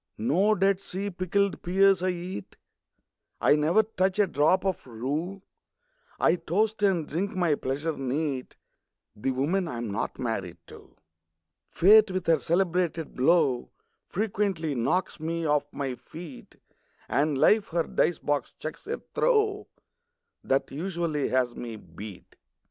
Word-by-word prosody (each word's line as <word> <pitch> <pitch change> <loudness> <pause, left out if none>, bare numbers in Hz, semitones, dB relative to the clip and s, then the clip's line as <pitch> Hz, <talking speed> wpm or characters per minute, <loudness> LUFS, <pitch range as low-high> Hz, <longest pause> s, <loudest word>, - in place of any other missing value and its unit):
No 185 - +2
Dead 195 0 +2
Sea 195 +1 -4
pickled 190 +2 0
pears 195 +1 +4
I 185 - +1
eat; 175 - -5 0.8
I 145 - +5
never 160 +8 +3
touch 190 -3 0
a 205 - +5
drop 175 +3 +2
of 190 -7 -2
rue; 150 - -4 0.8
I 165 - +3
toast, 205 +6 0
and 185 -7 +2
drink 185 +6 -2
my 175 -4 +2
pleasure 145 +3 -2
neat, 135 0 -3 0.6
The 105 +5 -2
women 155 +9 0
I'm 120 -6 -4
not 100 +2 -3
married 110 -8 -3
to! - - -15 0.7
Fate 210 +4 +6
with 185 -1 -3
her 165 -2 +4
celebrated 170 0 0
blow 135 -2 +2 0.4
Frequently 195 -6 -1
knocks 150 +10 0
me 165 +1 -2
off 150 -1 +1
my 135 -2 -3
feet; 145 +4 -11 0.5
And 145 0 +1
Life 210 +8 +4
her 170 0 0
dice 175 - +1
box 145 -3 -2
chucks 155 - -8
a 460 - -3
throw 425 -4 +2 0.8
That 135 +1 0
usually 165 -1 -2
has 125 -2 +1
me 115 -2 -6
beat. 100 +1 -11
165 Hz, 135 wpm, -27 LUFS, 135-190 Hz, 0.8 s, Fate